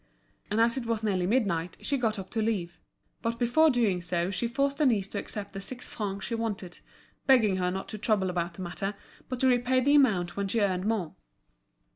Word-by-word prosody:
And 210 +2 0
as 230 +2 +4
it 240 -3 -3
was 225 -1 -1
nearly 185 -4 +1
midnight, 185 -7 0
she 285 - -1
got 225 -5 0
up 190 -1 -7
to 225 - -1
leave. 195 -6 -2 0.4
But 230 0 -1
before 250 +7 +4
doing 225 -9 +2
so 175 +1 -1
she 200 +5 -1
forced 275 +4 0
Denise 230 -10 +3
to 205 - -3
accept 200 -1 -6
the 195 - -5
six 250 +5 -8
francs 200 -2 -4
she 235 - -4
wanted, 210 -6 -3 0.5
begging 225 -8 +5
her 180 -1 +1
not 190 +1 -4
to 215 - -6
trouble 195 -4 +1
about 170 -1 -2
the 185 - -6
matter, 195 +3 -3 0.3
but 255 -1 -3
to 265 - +4
repay 250 +1 +3
the 280 +3 +3
amount 200 -12 +3
when 200 0 -1
she 225 +4 0
earned 190 -2 +1
more. 215 -7 -1
215 Hz, 210 wpm, -28 LUFS, 185-240 Hz, 0.5 s, begging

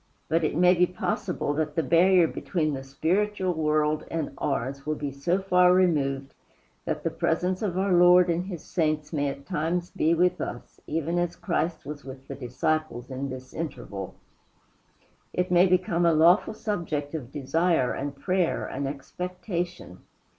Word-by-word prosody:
But 165 +1 +2
it 155 - 0
may 180 +1 +6
be 180 0 +3
possible 180 -4 -2
that 150 0 -2
the 165 - +1
barrier 180 +2 +5
between 155 -2 -2
the 135 - -4
spiritual 185 +7 0
world 155 -1 +1
and 160 -3 -3
ours 135 -1 -2
will 155 +1 -1
be 145 -2 -4
so 155 +7 0
far 180 -1 +5
removed 140 -7 +1 0.5
that - - -3
the - - 0
presence 180 +3 0
of 190 -5 -1
our 190 0 +2
Lord 180 +1 +7
and 175 +1 0
his 175 -6 -6
saints 155 -2 -1
may 145 -2 0
at 140 0 -8
times 170 +4 -2
be 165 +2 +2
with 180 +1 +2
us, 120 - -7
even 165 +2 -1
as 175 0 -1
Christ 165 -2 -2
was 145 0 -7
with 130 0 -10
the - - -5
disciples 130 0 -2
in 135 +1 -3
this 130 0 -8
interval. 100 - -6 1.2
It 180 0 -1
may 180 +1 +6
become 180 -1 +1
a 165 - +4
lawful 175 +7 +4
subject 165 -10 -3
of 135 -6 -5
desire 150 0 +1
and 140 +1 -4
prayer 180 +4 0
and 140 - -3
expectation. 175 - -5
165 Hz, 165 wpm, -26 LUFS, 140-180 Hz, 1.2 s, Lord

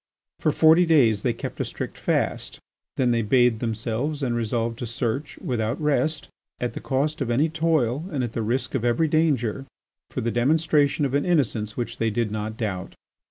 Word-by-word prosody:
For - - +2
forty 165 +2 +5
days 120 -10 +4
they 120 - +1
kept 115 - -6
a - - +1
strict - - -6
fast. - - -1 0.4
Then 125 -2 +2
they 115 -1 +2
bathed 120 +1 +3
themselves 120 +6 -2
and 120 -2 0
resolved 115 0 -1
to 120 - -4
search, 125 +4 -3
without 115 0 -2
rest, 155 +1 0 0.3
at 125 - -2
the - - -5
cost 145 +4 -1
of 130 - -1
any 140 +7 +2
toil 155 -4 +1
and 140 -5 -1
at 120 -2 -4
the 115 - -2
risk 120 +3 -1
of 130 - -1
every 120 +7 +2
danger, 140 -5 +1 0.4
for - - -4
the 115 - -1
demonstration 145 +3 +2
of 135 - -2
an 140 0 +2
innocence 115 -11 0
which 120 - -4
they 115 - +2
did 110 0 -1
not 110 +1 -4
doubt. 95 -5 -4
125 Hz, 190 wpm, -24 LUFS, 115-150 Hz, 0.4 s, forty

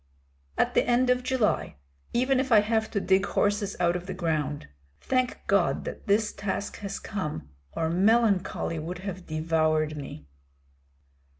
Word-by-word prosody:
"At - - +2
the - - +4
end 250 +1 +3
of 250 0 +2
July, 250 - 0 0.4
even 255 +2 +2
if 260 -1 -1
I 215 -2 +7
have 220 +1 0
to 205 - -1
dig 190 0 +3
horses 205 -1 0
out 175 -1 +2
of 180 +1 -5
the 190 - -4
ground. 155 -5 -2 0.3
Thank 255 -1 0
God - - +2
that - - -7
this 210 +1 +2
task 200 0 -3
has 200 -1 -5
come, 150 - -5 0.2
or 160 - -1
melancholy 195 -2 +2
would 165 +3 -5
have 185 -2 -6
devoured 155 -1 +1
me." 135 - -8
195 Hz, 155 wpm, -27 LUFS, 160-220 Hz, 0.4 s, I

